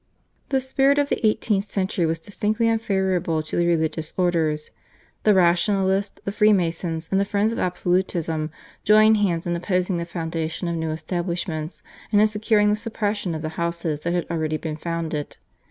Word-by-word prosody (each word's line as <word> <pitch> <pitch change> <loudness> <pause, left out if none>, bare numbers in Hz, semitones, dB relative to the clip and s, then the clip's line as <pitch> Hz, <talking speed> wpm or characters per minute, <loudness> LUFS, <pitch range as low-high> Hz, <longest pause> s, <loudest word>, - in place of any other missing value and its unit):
The 270 - +2
spirit 270 +2 +2
of 285 0 +2
the - - -1
eighteenth 215 -2 +2
century 185 -4 -1
was 165 +1 0
distinctly 210 +6 -1
unfavourable 190 -7 0
to 155 - -5
the 175 0 +2
religious 160 -1 0
orders. 160 -4 +1 0.5
The 210 -2 +6
Rationalists, 190 +2 +2
the 200 - -1
Freemasons, 175 -6 +1
and 195 0 +3
the - - +3
friends 205 +2 0
of - - -4
absolutism 175 -3 0 0.3
joined 215 +1 +6
hands 175 -5 0
in 175 0 -1
opposing 180 +1 0
the 170 - -3
foundation 165 0 -3
of 170 - -1
new 160 -1 -2
establishments 170 0 -3 0.3
and 205 - +4
in 210 - +6
securing 210 0 +2
the 210 - +3
suppression 210 -5 -2
of 155 - -5
the 155 - -2
houses 170 -3 -2
that 170 +2 -1
had 175 - 0
already 155 -2 -1
been 155 -1 -4
founded. 160 -2 -4
180 Hz, 170 wpm, -23 LUFS, 165-210 Hz, 0.5 s, The